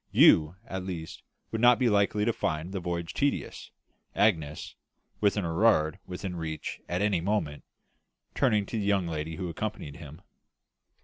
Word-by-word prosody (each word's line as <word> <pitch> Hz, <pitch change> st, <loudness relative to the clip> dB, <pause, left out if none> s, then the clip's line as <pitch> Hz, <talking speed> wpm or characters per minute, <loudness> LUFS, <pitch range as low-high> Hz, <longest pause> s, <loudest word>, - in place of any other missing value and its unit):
"You 80 Hz, +2 st, +6 dB
at 95 Hz, 0 st, -5 dB
least 85 Hz, -4 st, -6 dB, 0.3 s
would 110 Hz, -, -2 dB
not 120 Hz, 0 st, +7 dB
be 125 Hz, -, +2 dB
likely 105 Hz, -1 st, +2 dB
to 115 Hz, -, +2 dB
find 80 Hz, 0 st, -2 dB
the 95 Hz, -, -3 dB
voyage 85 Hz, -1 st, -3 dB
tedious, 145 Hz, 0 st, -2 dB, 0.5 s
Agnes, 80 Hz, -8 st, +1 dB, 0.5 s
with 105 Hz, 0 st, +2 dB
an 100 Hz, -, 0 dB
Erard 80 Hz, -2 st, +2 dB
within 90 Hz, 0 st, -5 dB
reach 80 Hz, -2 st, -5 dB
at 90 Hz, +3 st, 0 dB
any 100 Hz, -5 st, +2 dB
moment," 85 Hz, -7 st, -1 dB, 0.7 s
turning 105 Hz, -2 st, +2 dB
to 110 Hz, -, -3 dB
the -, -, -1 dB
young 100 Hz, -3 st, +2 dB
lady 80 Hz, -1 st, -4 dB
who 90 Hz, 0 st, -4 dB
accompanied 85 Hz, -5 st, -5 dB
him. 80 Hz, +3 st, -11 dB
90 Hz, 160 wpm, -28 LUFS, 80-105 Hz, 0.7 s, not